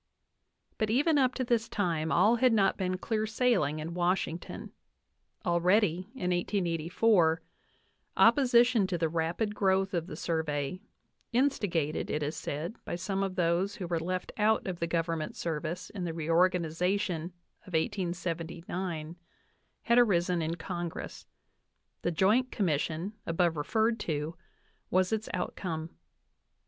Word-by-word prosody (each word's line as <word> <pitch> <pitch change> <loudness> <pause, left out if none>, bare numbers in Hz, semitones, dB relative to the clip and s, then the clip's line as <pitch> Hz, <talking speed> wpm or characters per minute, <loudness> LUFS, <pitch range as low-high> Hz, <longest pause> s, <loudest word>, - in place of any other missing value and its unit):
But 215 -2 +1
even 290 +6 +3
up 260 -1 +2
to 260 - -1
this 235 -2 0
time 165 -6 -1
all 230 +3 +4
had 250 0 +4
not 200 -3 +3
been 185 -1 -1
clear 215 +3 -1
sailing 220 - +1
in 155 +2 -5
Washington. 175 -1 -2 0.7
Already, 180 +1 +2
in 180 -7 -1
1884, 175 -1 +2 0.7
opposition 245 -6 +5
to 180 - -1
the 165 -1 +1
rapid 170 +6 -1
growth 195 -1 +1
of 170 -1 -1
the - - -7
Survey, 160 0 -2 0.5
instigated, 205 - +1
it 150 - -1
is 150 +2 -2
said, 165 - -4
by - - -4
some 195 +2 -2
of 195 -1 -2
those 180 +3 +1
who 185 - -5
were 170 -1 -1
left 185 +2 -3
out 215 +1 +2
of 180 -2 -4
the 170 - -1
Government 165 -1 -1
service 165 +2 -4
in 195 -4 -5
the 165 -2 -3
reorganization 170 +1 +1 0.4
of 185 - -11
1879, 170 -2 -3 0.7
na 235 - +5
d 245 - +8
arisen 180 -5 +2
in 160 +1 -1
Congress; 175 -1 -6 0.7
the - - 0
Joint 210 +9 +2
Commission, 165 0 -1
above 165 0 +2
referred 220 +9 +1
to, 155 -2 -3 0.5
was 185 0 +2
its 215 0 -2
outcome. 170 -3 -3
180 Hz, 135 wpm, -30 LUFS, 165-210 Hz, 0.7 s, d